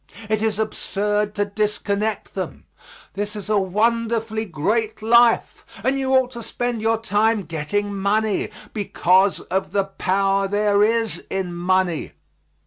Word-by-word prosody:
It 215 -1 +1
is 220 -2 0
absurd 210 -1 -1
to 205 -1 +1
disconnect 210 +1 -2
them. - - -5 0.5
This 205 +2 -3
is 210 +1 -5
a 210 - +4
wonderfully 225 +2 0
great 215 +6 -1
life, 235 +1 +4 0.2
and 270 +1 +1
you 265 -1 -1
ought 260 -1 +3
to 235 -2 -7
spend 235 0 -3
your 225 +1 +2
time 220 -1 +1
getting 195 +6 -2
money, 205 +1 0 0.2
because 190 -1 +2
of 190 +1 -3
the 200 - +2
power 195 0 0
there 205 0 +2
is 220 -5 +1
in 190 -2 -2
money. 180 -1 0
210 Hz, 135 wpm, -22 LUFS, 195-225 Hz, 0.5 s, a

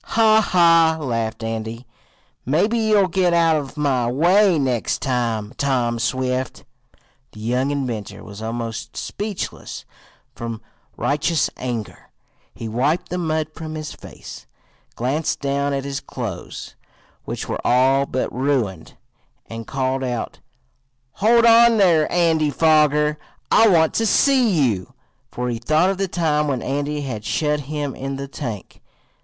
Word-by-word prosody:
"Ha! 220 -1 +4
ha!" 165 -4 +4
laughed 115 -5 -3
Andy. 115 +2 -4 0.6
"Maybe 175 - +1
you'll 215 -3 +3
get 180 -1 +1
out 165 -1 +4
of 145 -1 -4
my 130 -5 +1
way 180 +6 +4
next 130 -5 0
time, 115 -4 -1
Tom 125 -4 0
Swift." 130 +1 -2 0.7
The - - -12
young 125 +5 0
inventor 120 -8 -4
was 100 +1 -10
almost 115 -1 -5
speechless 205 -2 -5 0.5
from 115 -1 -6 0.4
righteous 150 +2 0
anger. 120 -4 -6 0.4
He 115 - -7
wiped 145 +11 0
the 180 - -3
mud 155 -2 -1
from 155 0 -7
his 155 -1 -6
face, - - -11 0.5
glanced 140 +6 -1
down 140 0 -1
at 135 -1 -2
his 140 0 -3
clothes, 110 -12 -7 0.5
which - - -5
were - - -3
all 135 +3 +3
but 130 - -2
ruined, 125 - -2 0.5
and 115 -1 -8
called 135 0 -1
out: 125 -3 -4 0.7
"Hold 230 +8 +3
on 230 0 +6
there, 170 -6 +3
Andy 165 -3 +2
Foger! 150 0 +3 0.3
I 225 - +6
want 165 -5 +4
to 225 - +1
see 260 0 +4 0.2
you!" 110 +4 -4 0.4
for 125 0 -3
he 115 -1 -3
thought 155 +9 +2
of 195 - -5
the 195 - 0
time 155 -4 0
when 130 -5 -2
Andy 145 +2 -2
had 120 -7 -5
shut 150 +5 0
him 145 -3 -3
in 135 +1 -4
the 140 +1 -5
tank. 120 -8 -7
140 Hz, 140 wpm, -21 LUFS, 120-165 Hz, 0.7 s, on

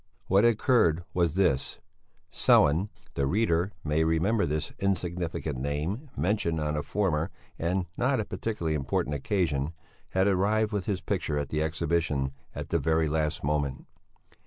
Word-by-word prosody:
What 95 +3 +4
had 120 - +6
occurred 100 - +3
was 85 -3 +1
this: 80 -9 +1 0.6
Sellén 80 +8 +4 0.2
the 70 - 0
reader 90 0 +1
may 75 +1 +1
remember 85 +7 +2
this 75 +2 -2
insignificant 90 -7 -2
name 75 - -3
mentioned 85 -4 0
on 75 0 -1
a 75 - 0
former, 85 -3 0 0.3
and 90 +2 0
not 130 +1 +1
a 110 - -1
particularly 95 -10 -2
important 70 0 -1
occasion 75 -1 0 0.4
had 95 0 +2
arrived 105 +3 +2
with 100 -4 -2
his 95 -3 -1
picture 85 -7 -1
at 70 -1 -2
the 75 - -1
exhibition 80 -3 0 0.2
at - - -5
the - - +1
very 80 0 +2
last 80 +1 -1
moment. 70 -2 -1
85 Hz, 150 wpm, -28 LUFS, 75-100 Hz, 0.6 s, had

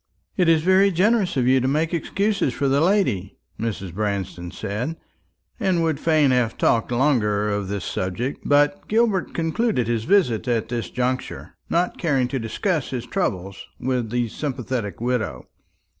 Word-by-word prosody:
"It 180 -3 +3
is 160 -1 +4
very 190 +2 +5
generous 195 -1 +2
of 125 - +2
you 130 +1 +4
to 130 - 0
make 155 +5 0
excuses 195 - 0
for 140 +2 0
the 140 +2 +2
lady," 165 - +1 0.2
Mrs. 100 -6 -4
Branston 95 -3 -3
said; 110 - -4 0.6
and 185 -6 +1
would 160 -3 0
fain 155 -4 +3
have 125 -3 +1
talked 115 +1 +2
longer 115 -6 +2
of 100 -1 -2
this 100 -1 -4
subject, 115 +9 -3
but 145 +6 +2
Gilbert 220 -4 +1
concluded 165 - 0
his 115 -1 -1
visit 160 - +2
at 115 -3 0
this 115 -7 -3
juncture, 125 +3 -3 0.2
not 175 +2 0
caring 135 -7 +1
to 135 - -2
discuss 140 - -1
his 125 -3 -4
troubles 95 - -3
with 125 -3 -1
the 120 +1 0
sympathetic 125 - -4
widow. 110 - -2
130 Hz, 160 wpm, -23 LUFS, 110-165 Hz, 0.6 s, very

